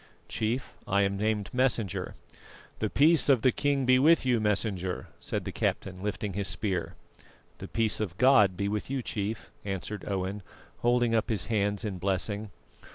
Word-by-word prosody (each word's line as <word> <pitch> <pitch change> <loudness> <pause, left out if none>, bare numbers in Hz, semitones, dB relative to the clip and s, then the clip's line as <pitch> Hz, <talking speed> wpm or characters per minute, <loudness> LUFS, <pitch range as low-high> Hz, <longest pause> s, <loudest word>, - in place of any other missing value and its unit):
"Chief, 115 +4 -2
I 100 0 +3
am 100 0 0
named 105 0 -1
Messenger." 120 -7 0 0.6
"The 110 - 0
peace 155 +4 +4
of 130 -5 +4
the 130 - +5
king 140 -1 0
be 130 0 +5
with 155 +1 +5
you, 125 -2 +3
Messenger," 100 -3 -1
said - - -3
the - - -3
captain, 95 -1 -2
lifting 105 0 -3
his 100 0 -1
spear. 90 +2 -2 0.6
"The - - -7
peace 115 -2 +1
of 95 -4 -3
God 105 -8 +5
be 100 - -1
with 105 +3 -3
you, 135 -2 -2
Chief," 105 +1 -4
answered 100 +1 -4
Owen, 95 +1 -2 0.4
holding 120 -1 +2
up 115 +1 +1
his 110 -3 0
hands 105 +1 0
in 95 -4 -4
blessing. 100 +3 -1
105 Hz, 165 wpm, -28 LUFS, 100-120 Hz, 0.6 s, the